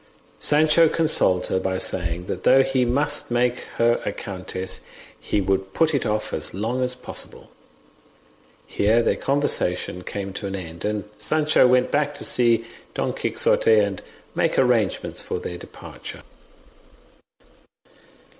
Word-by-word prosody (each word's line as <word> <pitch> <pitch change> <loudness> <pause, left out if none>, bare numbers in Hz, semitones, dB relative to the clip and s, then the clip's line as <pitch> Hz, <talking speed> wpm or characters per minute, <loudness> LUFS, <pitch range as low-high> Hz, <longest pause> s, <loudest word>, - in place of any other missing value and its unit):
Sancho 155 +2 +4
consoled 150 - +2
her 95 - 0
by 95 0 -1
saying 85 -1 +1
that 90 - -4
though 135 +1 +6
he 135 -1 +1
must 145 +4 0
make 120 0 +1 0.2
her 120 0 +3
a - - -2
countess, 95 -1 -5 0.4
he 105 - -1
would 95 0 -1
put 160 -1 +2
it 140 - 0
off 105 0 -2
as 75 +3 -2
long 115 +6 -2
as 125 0 -1
possible. - - -8 1.1
Here 110 +3 +2
their - - +2
conversation 90 -10 -1
came 100 0 -5
to 100 - -5
an 95 - -4
end, 85 -3 -8
and 105 -1 -1 0.2
Sancho 155 +3 +3
went 125 0 +3
back 145 0 0
to - - -5
see 115 -2 +2 0.3
Don - - -1
Quixote, 480 -1 +2
and - - +1 0.3
make - - 0
arrangements - - +1
for 455 - -4
their 460 +1 -6
departure. - - -10
120 Hz, 140 wpm, -23 LUFS, 95-145 Hz, 1.1 s, though